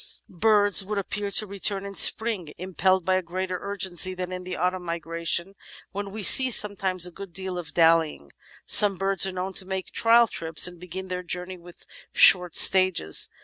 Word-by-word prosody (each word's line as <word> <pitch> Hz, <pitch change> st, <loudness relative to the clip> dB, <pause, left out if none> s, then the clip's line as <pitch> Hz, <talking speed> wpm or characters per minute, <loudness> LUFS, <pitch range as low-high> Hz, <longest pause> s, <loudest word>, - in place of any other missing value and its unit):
Birds 205 Hz, -3 st, +2 dB
would 210 Hz, +2 st, -6 dB
appear 200 Hz, +1 st, -5 dB
to 200 Hz, +2 st, 0 dB
return 200 Hz, 0 st, -4 dB
in 200 Hz, -, -9 dB
spring 200 Hz, -7 st, +3 dB
impelled 185 Hz, 0 st, -2 dB
by 185 Hz, 0 st, 0 dB
a -, -, -3 dB
greater 185 Hz, +1 st, -6 dB
urgency 190 Hz, -2 st, -3 dB
than 180 Hz, 0 st, -7 dB
in 180 Hz, 0 st, -8 dB
the 180 Hz, 0 st, -8 dB
autumn 180 Hz, +2 st, -3 dB
migration, 170 Hz, +2 st, -4 dB, 0.4 s
when 200 Hz, 0 st, -7 dB
we 210 Hz, +1 st, -9 dB
see 260 Hz, +6 st, +8 dB
sometimes 195 Hz, -5 st, +2 dB
a 180 Hz, -, -4 dB
good 195 Hz, +1 st, -12 dB
deal 190 Hz, +1 st, -7 dB
of 165 Hz, -4 st, -9 dB
dallying. 165 Hz, -, 0 dB, 0.3 s
Some 200 Hz, -2 st, +3 dB
birds 195 Hz, 0 st, +1 dB
are -, -, -5 dB
known 185 Hz, +1 st, -7 dB
to 190 Hz, -, -3 dB
make 190 Hz, -1 st, -7 dB
trial 230 Hz, +1 st, +3 dB
trips 165 Hz, -7 st, -2 dB
and 175 Hz, -1 st, -4 dB
begin 185 Hz, +2 st, -9 dB
their 180 Hz, -1 st, -6 dB
journey 180 Hz, +1 st, -7 dB
with 175 Hz, 0 st, -18 dB, 0.3 s
short 180 Hz, -2 st, +4 dB
stages. 185 Hz, -, +3 dB
185 Hz, 185 wpm, -23 LUFS, 175-195 Hz, 0.4 s, see